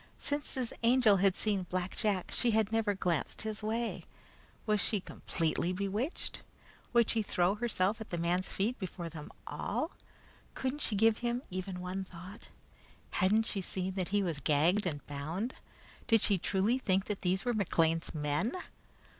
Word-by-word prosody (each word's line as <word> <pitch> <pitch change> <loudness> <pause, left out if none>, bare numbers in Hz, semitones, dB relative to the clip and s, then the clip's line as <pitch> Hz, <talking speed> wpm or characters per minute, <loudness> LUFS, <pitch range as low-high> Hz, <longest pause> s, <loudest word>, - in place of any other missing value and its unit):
Since 290 0 -2
his 255 -3 -1
Angel 235 -3 +5
had 190 0 +4
seen 200 -4 0
Black 185 0 -2
Jack 200 -4 0
she 245 - +2 0.2
never 225 -1 +1
had 200 -1 0
glanced 170 0 -1
his 215 -1 -4
way. 225 +2 -2 0.6
Was 210 -2 +2
she 215 -1 +2
completely 170 -1 -1
bewitched? 200 - -2 0.5
Would 235 -2 +4
she 225 - +2
throw 180 -2 +2
herself 210 -1 0
at 220 - -7
the 175 - -2
man's 175 +2 +1
feet 220 +6 -1
before 180 -3 -5
them 155 -2 -8 0.2
all? 320 - -2 0.6
Couldn't 265 +3 -2
she 215 - +2
give 220 +2 +4
him 240 +1 -1
even 185 0 -4
one 185 +1 -3
thought? 185 +3 -11 0.6
Hadn't 210 +4 +3
she 200 -3 -2
seen 185 +1 -2
that 185 -2 -1
he 205 0 +2
was 165 -6 -2
gagged 170 +8 +3
and 145 -4 -4
bound? 160 - -3 0.5
Did 225 -3 +5
she 200 -4 +2
truly 205 +9 +2
think 195 -5 +1
that 210 -2 -3
these 185 +4 +1
were 245 - +2
McLean's 165 -5 +1
men? 150 - 0
195 Hz, 165 wpm, -33 LUFS, 180-225 Hz, 0.6 s, Angel